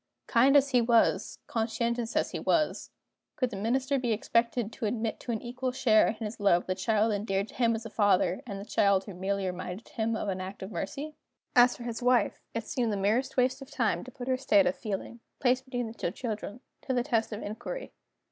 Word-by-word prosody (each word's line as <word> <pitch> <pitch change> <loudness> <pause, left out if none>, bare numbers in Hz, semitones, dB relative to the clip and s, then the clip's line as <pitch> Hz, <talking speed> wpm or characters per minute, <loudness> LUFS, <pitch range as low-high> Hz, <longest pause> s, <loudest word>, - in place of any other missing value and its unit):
Kind 265 +5 +5
as 280 0 +3
he 250 -2 +4
was, 230 0 +2
conscientious 235 +1 -1
as - - +1
he - - -3
was, 305 -2 +1 0.5
could 255 -5 0
the - - -5
Minister 260 +7 0
be 240 -3 0
expected 230 +1 0
to 220 - -2
admit 225 0 -2
to - - -5
an 225 - -3
equal 250 +1 -3
share 245 -4 +4
in - - -1
his 215 +1 -6
love 195 -4 +3
the 185 - 0
child 215 +3 +1
endeared 200 0 -1
to - - -13
him 230 -2 +2
as 225 +1 -6
a - - -5
father, 200 -1 +2
and 200 -3 -5
the 200 - -7
child 200 -3 +3
who 200 - -9
merely 195 +2 -2
reminded 185 +3 -5
him 225 0 -1
of 215 - -3
an 190 -1 -2
act 190 +1 -7
of 190 - -7
mercy? 300 +7 -4 0.4
As 245 0 +6
for 240 - -8
his 235 0 -4
wife, 250 0 +2
it 230 -1 -2
seemed 240 -3 -1
the 205 - -1
merest 230 +8 0
waste 255 +2 +2
of 270 - -10
time 240 -8 0
to 255 - -9
put 245 0 -8
her 260 -1 +2
state 275 +2 +4
of 270 +1 +1
feeling 230 -1 -5 0.2
(placed 255 0 +2
between 245 -2 -3
the 220 - -7
two 205 - -2
children) 220 +1 -5 0.2
to 260 - -2
the 245 - +2
test 230 -5 0
of 210 - -5
inquiry. 240 - -6
230 Hz, 225 wpm, -29 LUFS, 210-255 Hz, 0.5 s, As